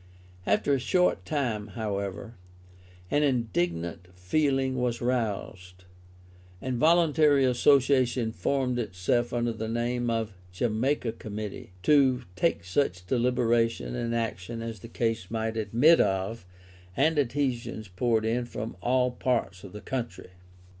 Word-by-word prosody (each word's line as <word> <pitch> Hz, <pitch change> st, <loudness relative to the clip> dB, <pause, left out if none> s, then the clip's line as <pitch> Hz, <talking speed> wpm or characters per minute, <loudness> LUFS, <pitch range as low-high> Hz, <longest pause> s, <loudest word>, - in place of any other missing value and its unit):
After 140 Hz, -, +2 dB
a 135 Hz, -, +2 dB
short 180 Hz, +8 st, +1 dB
time, 120 Hz, -9 st, -2 dB
however, 100 Hz, -1 st, -4 dB, 0.8 s
an 145 Hz, -, +3 dB
indignant 90 Hz, -, -1 dB
feeling 135 Hz, +7 st, 0 dB
was 125 Hz, -1 st, -1 dB
roused: 100 Hz, -7 st, -3 dB, 0.8 s
a 130 Hz, -, -4 dB
voluntary 150 Hz, 0 st, +4 dB
Association 125 Hz, -2 st, +3 dB
formed 125 Hz, +5 st, -1 dB
itself 110 Hz, +3 st, 0 dB
under 120 Hz, -1 st, 0 dB
the 110 Hz, 0 st, -5 dB
name 120 Hz, +1 st, -1 dB
of 115 Hz, -2 st, -1 dB
the -, -, -19 dB, 0.2 s
Jamaica 120 Hz, +5 st, 0 dB
Committee, 105 Hz, -4 st, -7 dB
to 135 Hz, -4 st, +4 dB
take 165 Hz, -, +1 dB
such 90 Hz, -3 st, -1 dB
deliberation 120 Hz, 0 st, +1 dB
and 115 Hz, -1 st, -2 dB
action 115 Hz, 0 st, -3 dB
as 115 Hz, -2 st, -6 dB
the 105 Hz, -, -10 dB
case 115 Hz, -4 st, -2 dB
might 110 Hz, 0 st, -2 dB
admit 120 Hz, +9 st, +4 dB
of, 95 Hz, +1 st, -1 dB, 0.5 s
and 155 Hz, +2 st, +3 dB
adhesions 125 Hz, -5 st, -1 dB
poured 110 Hz, +4 st, 0 dB
in 120 Hz, +2 st, 0 dB
from 115 Hz, -2 st, -6 dB
all 125 Hz, +2 st, +2 dB
parts 100 Hz, -7 st, -1 dB
of 100 Hz, -, -10 dB
the 105 Hz, -, -9 dB
country. 120 Hz, -8 st, -5 dB
120 Hz, 125 wpm, -27 LUFS, 105-130 Hz, 0.8 s, voluntary